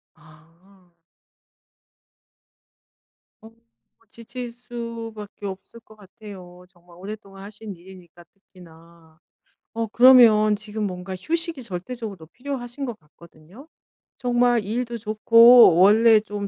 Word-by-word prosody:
아. 165 +4 -24 2.5
어. 220 - -14
뭐 230 0 -36
지칠 240 +1 -9
수밖에 230 -3 -9
없을 195 +4 -9
것 220 -1 -20
같아요. 190 -3 -14
정말 175 -1 -22
오랫동안 195 0 -11
하신 205 -1 -10
일이니까 175 -1 -17
특히나. 170 -3 -21 0.5
어 230 0 -3
그러면 225 -3 +5
지금 210 0 -5
뭔가 185 0 -7
휴식이 330 - -3
절대적으로 195 -2 -8
필요하신 255 - -7
것 240 -4 -7
같거든요. 170 - -19 0.5
정말 245 -2 +1
일도 235 +3 -4
좋고 230 -1 +5
원래 220 +4 +5
좀 205 -1 -7
210 Hz, 230 characters per minute, -22 LUFS, 180-235 Hz, 2.5 s, 그러면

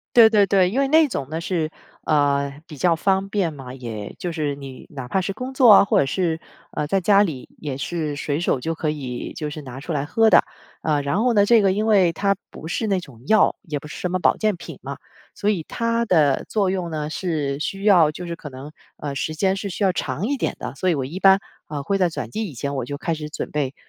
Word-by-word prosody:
对 230 -2 +9
对 210 -2 +4
对， 190 -2 +3
因 255 +7 0
为 275 - +2
那 315 +2 +6
种 140 - -4
呢， 160 +2 -3
是， 165 -3 -1 0.3
呃， 140 -1 +1
比 150 - -10
较 170 +3 +3
方 195 +2 +1
便 195 -5 0
嘛。 135 -4 -9
也 115 -5 -7
就 175 - -3
是 150 -3 -1
你， 135 -2 -10
哪 135 -4 -7
怕 190 +10 0
是 195 +2 -2
工 255 +4 -5
作 260 -3 +6
啊， 200 - +9
或 - - +2
者 - - +1
是， 165 +1 -1 0.3
呃， 150 - -2
在 195 +6 +1
家 200 +2 +5
里， 155 -10 -3
也 145 -4 -4
是 150 +1 -3
随 145 +1 -2
手 170 - +1
就 165 +6 -3
可 160 -1 -2
以 130 -5 -5
就 150 -1 -4
是 155 +1 -7
拿 130 -2 -8
出 165 +4 -5
来 140 -2 -1
喝 225 +7 +3
的。 - - +7 0.4
呃， 150 -2 +1
然 140 +10 0
后 245 -1 +2
呢， 205 -2 +5
这 230 +2 +5
个 195 -2 +3
因 210 +3 0
为 195 -6 +4
它 200 +4 +1 0.2
不 - - -10
是 200 +7 -2
那 195 -3 +1
种 130 -9 -14
药， 215 +4 +4
也 155 -7 -4
不 145 - -12
是 150 - -8
什 180 - -2
么 185 - 0
保 - - +3
健 215 -3 0
品 - - -10
嘛， - - -6 0.4
所 205 - 0
以 190 -6 -1
它 230 0 0
的 155 -8 +3
作 200 -4 +1
用 185 -3 -2
呢， 155 -1 -3
是 150 -5 -2
需 195 +5 -3
要 175 -7 +6
就 175 +3 -7
是 170 - -4
可 160 - -9
能， 135 +2 -10 0.2
呃， 145 -2 -5
时 155 +3 -2
间 190 +4 +1
是 200 +1 -4
需 200 +2 -2
要 190 - +3
长 160 +2 -2
一 280 +3 0
点 - - -2
的。 - - -6
所 185 +7 -1
以 175 - +3
我 135 -3 -2
一 165 +9 -6
般， 195 0 +7 0.3
呃， 145 -2 -4
会 195 +8 0
在 180 -2 +3
转 165 - -5
季 220 +1 -3
以 150 - -10
前 140 +4 -3
我 130 -3 -2
就 145 - -4
开 165 +3 -2
始 155 -1 -4
准 150 - -5
备， 140 -3 -2
165 Hz, 280 characters per minute, -22 LUFS, 145-195 Hz, 0.4 s, 对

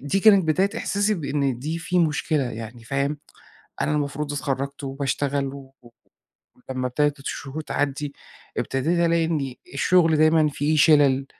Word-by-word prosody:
دي 145 +8 -1
كانت 200 -3 +6
بداية 190 +6 +2
إحساسي 205 0 0
بإن 140 - -1
دي 155 +6 -3
في 180 +2 -1
مشكلة، 155 -2 +1
يعني 115 +1 -8
فاهم، 140 +4 -1 0.6
أنا - - 0
المفروض 145 0 -2
اتخرَّجت، 140 0 -3
وباشتغل 140 +1 -1
و 135 -1 -12
و 120 - -16 0.8
ولمّا 130 -1 -2
إبتدت 145 +3 0
الشهور 140 +2 -5
تعدّي، 145 -1 -2 0.4
إبتديت 155 +7 0
ألاقي 165 0 +2
إن 145 -6 -2 0.2
الشغل 165 +2 +3
دايمًا 155 0 +4
في 145 +2 0
شِلَل، 140 -3 +5
145 Hz, 140 wpm, -24 LUFS, 135-160 Hz, 0.8 s, كانت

